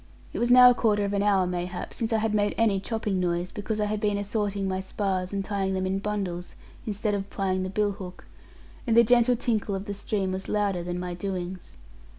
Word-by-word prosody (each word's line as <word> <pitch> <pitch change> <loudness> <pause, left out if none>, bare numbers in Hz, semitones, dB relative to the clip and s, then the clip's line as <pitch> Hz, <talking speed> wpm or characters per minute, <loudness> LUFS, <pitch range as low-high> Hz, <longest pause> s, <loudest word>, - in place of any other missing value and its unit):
It - - -3
was 240 - +1
now 250 0 +9
a - - +4
quarter 210 -4 +2
of 200 - -2
an 200 - +1
hour 200 -2 +3
mayhap, 180 0 -4
since 230 0 -2
I 225 - +3
had 220 0 0
made 205 -1 +1
any 215 -4 +3
chopping 210 -2 -2
noise, 175 0 -1
because 215 0 -3
I 210 - +2
had 210 0 -2
been 205 -1 +1
assorting 205 -1 -1
my 185 0 -1
spars, 190 -1 -2
and 195 -1 -2
tying 195 -2 -1
them 185 0 -1
in 190 +1 0
bundles, 195 -4 -4 0.3
instead 210 0 -1
of 200 0 -3
plying 190 -1 -1
the 185 - -2
bill 205 +1 +1
hook; 190 -3 -9 0.6
and 230 -1 +3
the 235 - +9
gentle 245 +1 +4
tinkle 220 -4 -1
of 195 +1 -5
the 205 - -4
stream 200 -1 -2
was 190 +1 -4
louder 200 -4 0
than 175 +1 -4
my 180 0 -4
doings. 180 - -5
200 Hz, 225 wpm, -27 LUFS, 185-210 Hz, 0.6 s, now